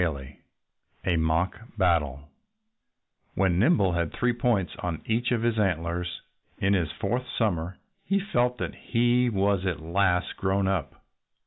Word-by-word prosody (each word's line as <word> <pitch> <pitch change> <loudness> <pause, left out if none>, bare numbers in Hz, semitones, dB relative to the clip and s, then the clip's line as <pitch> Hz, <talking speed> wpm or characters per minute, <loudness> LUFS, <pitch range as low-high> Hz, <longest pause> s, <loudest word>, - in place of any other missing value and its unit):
XV 80 -5 0 0.9
A 90 - +2
MOCK 85 +8 -1
BATTLE 75 -7 +1 1.1
When 90 -2 +2
Nimble 105 - +4
had 85 -2 -1
three 120 0 +1
points 120 -6 0
on 85 -3 -4
each 115 +2 0
of 115 -2 +1
his 115 -2 +1
antlers, 90 -2 -1 0.4
in 100 +1 +2
his 85 -5 +1
fourth 120 +5 -2
summer, 90 -5 0 0.3
he 200 0 +1
felt 125 -10 0
that - - -3
he 120 +1 +2
was 100 -3 +1
at 90 - -1
last 90 +2 0
grown 95 0 +1
up. 90 -8 -3
95 Hz, 140 wpm, -27 LUFS, 85-115 Hz, 1.1 s, Nimble